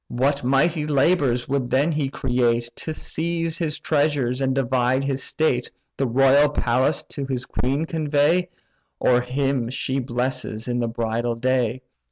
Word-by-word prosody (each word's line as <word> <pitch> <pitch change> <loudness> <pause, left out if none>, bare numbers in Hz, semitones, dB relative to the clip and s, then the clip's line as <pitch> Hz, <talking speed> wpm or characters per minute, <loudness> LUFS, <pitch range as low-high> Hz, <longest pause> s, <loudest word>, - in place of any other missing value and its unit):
What 140 +3 0
mighty 150 +5 +2
labours 140 -4 +2
would 140 0 0
he - - -6
then 145 +2 +1
create, 120 -4 0
To 160 - -5
seize 165 +1 -2
his 155 -3 -1
treasures, 145 -5 0
and 130 -1 +1
divide 130 0 +1
his 135 -1 -2
state, 130 -6 0 0.3
The 135 - 0
royal 135 +4 +4
palace 135 +1 +1
to 140 - -5
the 130 -2 -3
queen 140 +5 -1
convey, 160 +3 +1 0.5
Or 125 -1 +3
him 130 -1 -1
she 130 +1 -2
blesses 120 -2 -3
in 120 0 -1
the 120 - 0
bridal 115 +1 -2
day!" 125 0 0
135 Hz, 150 wpm, -23 LUFS, 125-145 Hz, 0.5 s, royal